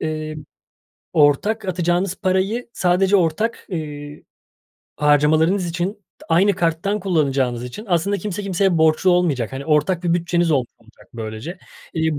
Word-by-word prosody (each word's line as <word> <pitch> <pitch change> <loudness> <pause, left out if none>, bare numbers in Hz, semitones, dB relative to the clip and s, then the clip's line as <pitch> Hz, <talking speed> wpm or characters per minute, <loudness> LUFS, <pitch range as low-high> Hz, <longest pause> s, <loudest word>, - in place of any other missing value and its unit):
Eee, 155 -1 -4 0.8
ortak 175 +9 +2
atacağınız 175 +1 0
parayı 195 +5 -1
sadece 185 +2 +2
ortak, 190 +6 0
iii, 150 -4 -6 0.7
harcamalarınız 155 +5 +3
için, 175 +3 -2 0.3
t - - -15
aynı 185 +5 +4
karttan 175 +4 -1
kullanacağınız 135 -9 0
için 125 - -8
aslında 190 +3 +1
kimse 205 -1 -4
kimseye 190 -2 +1
borçlu 160 +3 +3
olmayacak, 155 -11 +1
hani, 135 +2 -6
ortak 155 +4 +1
bir 170 - +2
bütçeniz 175 0 +1
olmuş 130 -5 +1
olacak 115 +1 -22
böylece. 110 - -6 0.4
İii, 160 -3 0
170 Hz, 135 wpm, -20 LUFS, 150-190 Hz, 0.8 s, aynı